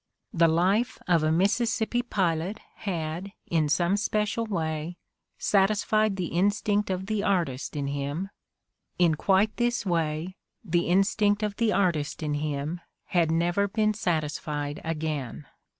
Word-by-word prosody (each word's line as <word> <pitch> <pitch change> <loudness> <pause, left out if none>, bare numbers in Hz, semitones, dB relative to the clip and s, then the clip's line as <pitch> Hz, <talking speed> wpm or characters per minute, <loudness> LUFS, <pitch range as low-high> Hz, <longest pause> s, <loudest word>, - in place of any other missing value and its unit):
The 170 -3 +4
life 190 +9 +2
of 170 -3 +4
a 155 0 +2
Mississippi 225 +6 +1
pilot 185 -4 -1 0.2
had, 175 0 -4
in 155 -3 +1
some 175 +6 +2
special 210 +2 0
way, 160 -3 -3 0.4
satisfied 210 +1 +2
the 180 -3 -3
instinct 205 +3 +1
of 185 0 -2
the 215 0 -1
artist 170 -12 -1
in 145 -1 -2
him; 145 +7 -3 0.7
in 175 -3 +4
quite 195 +6 +2
this 240 -2 0
way, 165 0 -1 0.3
the 175 -2 +1
instinct 205 +3 +2
of 210 -1 -2
the 230 -2 +2
artist 170 -7 0
in 150 -1 -1
him 150 +3 -3 0.3
had 170 -3 +2
never 175 +5 +1
been 215 +1 +1
satisfied 150 -5 -2
again. 155 -4 -3
180 Hz, 135 wpm, -27 LUFS, 160-205 Hz, 0.7 s, The